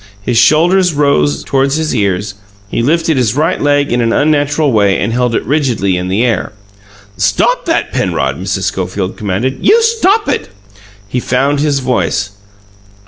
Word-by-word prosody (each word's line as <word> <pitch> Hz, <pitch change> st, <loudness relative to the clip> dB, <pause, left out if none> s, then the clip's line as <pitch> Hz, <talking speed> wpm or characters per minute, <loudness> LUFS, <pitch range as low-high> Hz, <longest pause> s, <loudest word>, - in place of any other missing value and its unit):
His 120 Hz, 0 st, +1 dB
shoulders 175 Hz, +4 st, +3 dB
rose 75 Hz, -, +1 dB
toward 135 Hz, -, 0 dB
his 155 Hz, +1 st, -1 dB
ears; 100 Hz, 0 st, -1 dB, 0.3 s
he 110 Hz, -, -2 dB
lifted 160 Hz, +3 st, +1 dB
his 120 Hz, -2 st, +1 dB
right 160 Hz, +5 st, 0 dB
leg 145 Hz, 0 st, +1 dB
in 120 Hz, 0 st, +1 dB
an 115 Hz, -1 st, +1 dB
unnatural 145 Hz, +1 st, +1 dB
way 100 Hz, -4 st, +2 dB
and 115 Hz, +3 st, -2 dB
held 125 Hz, -1 st, 0 dB
it -, -, -2 dB
rigidly 120 Hz, -8 st, 0 dB
in 90 Hz, 0 st, -3 dB
the 100 Hz, +5 st, 0 dB
air. 110 Hz, -3 st, -1 dB, 0.6 s
"Stop -, -, +1 dB
that, -, -, -1 dB
Penrod!" 70 Hz, 0 st, -1 dB
Mrs. -, -, -2 dB
Schofield 95 Hz, -2 st, -3 dB
commanded. 110 Hz, +6 st, -2 dB
"You 450 Hz, -, +5 dB
stop 450 Hz, -2 st, +2 dB
it!" -, -, -2 dB, 0.6 s
He 125 Hz, +5 st, -2 dB
found 135 Hz, +4 st, 0 dB
his 145 Hz, -2 st, 0 dB
voice. 100 Hz, -5 st, -1 dB
125 Hz, 160 wpm, -13 LUFS, 100-150 Hz, 0.6 s, You